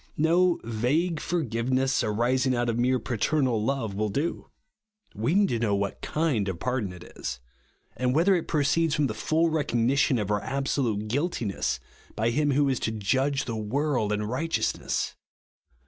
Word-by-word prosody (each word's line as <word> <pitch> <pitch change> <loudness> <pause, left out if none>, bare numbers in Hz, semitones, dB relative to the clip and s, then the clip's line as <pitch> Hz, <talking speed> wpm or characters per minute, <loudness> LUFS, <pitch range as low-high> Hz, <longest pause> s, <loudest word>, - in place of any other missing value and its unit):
No 170 +3 +3
vague 135 +10 0
forgiveness, 130 -4 0
arising 125 +4 +1
out 120 0 0
of 115 0 -1
mere 130 +1 +3
paternal 125 -1 0
love, 120 -4 -1
will 105 +2 -1
do. 145 +11 -2 0.6
We 115 - 0
need 200 -1 +4
to 115 - 0
know 105 -3 +1
vvliat 100 0 -3
Iciml 150 -11 0
of 95 -3 -3
pardon 125 -5 -1
it 90 -1 -10
is; 60 0 -4 0.6
and 125 0 0
whether 175 +5 +4
it 170 - -2
proceeds 155 +1 +2
from 150 - +2
the 125 - -1
full 160 +9 +1
recogni 135 -5 +1
tion 140 -2 +3
of 105 -2 -2
our 105 0 +1
absolute 130 -6 -1
guiltiness 120 - -1 0.4
by 115 +2 +1
him 145 +4 +1
who 140 +1 +3
Is 130 -3 0
to 110 - -1
"judge 130 +7 0
the 115 - -3
world 115 +1 0
in 105 0 0
righteousness." 130 +10 -1
130 Hz, 165 wpm, -27 LUFS, 110-150 Hz, 0.6 s, need